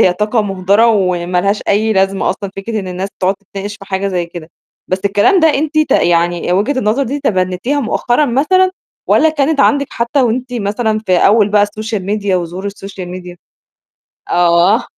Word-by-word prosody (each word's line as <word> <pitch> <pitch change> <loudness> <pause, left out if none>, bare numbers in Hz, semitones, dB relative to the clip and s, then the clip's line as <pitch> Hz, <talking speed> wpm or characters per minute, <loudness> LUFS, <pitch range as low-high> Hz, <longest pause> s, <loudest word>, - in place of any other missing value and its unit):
هي 180 - +4
طاقة 210 +4 0
مُهدرة، 200 +3 +2
وما 180 -4 +1
لهاش 200 +2 0
أي 215 +2 +2
لازمة 195 -1 +1
أصلًا 195 +1 -5
فكرة 215 +2 -3
إن 190 - -7
الناس 185 +2 -4
تقعد 190 +1 +1
تتناقش 200 +1 -8
في 205 - -13
حاجة 195 0 -2
زي 180 -3 -2
كده. 170 -1 -10 0.4
بس 185 - 0
الكلام 205 - +3
ده 320 - +5
أنتِ 310 +2 -1
ت 310 - +1
يعني 175 0 +1
وجهة 215 +9 0
النظر 220 +3 +1
دي 275 +3 -3
تبنيتيها 190 +4 -1
مؤخرًا 240 +4 0
مثلًا، 310 +9 +2 0.4
والّا 320 - +4
كانت 305 -1 0
عندِك 280 0 +3
حتى 235 +4 0
وأنتِ 245 +1 -1
مثلًا 215 0 -1
في 185 - +1
أول 205 +3 +4
بقى 205 0 +3
الsocial 215 +1 -4
media 200 +1 -2
وظهور 180 +2 -2
الsocial 195 -1 -8
media؟ 180 -1 -11 1.0
آه. 175 +5 +3
205 Hz, 175 wpm, -15 LUFS, 185-240 Hz, 1.0 s, ده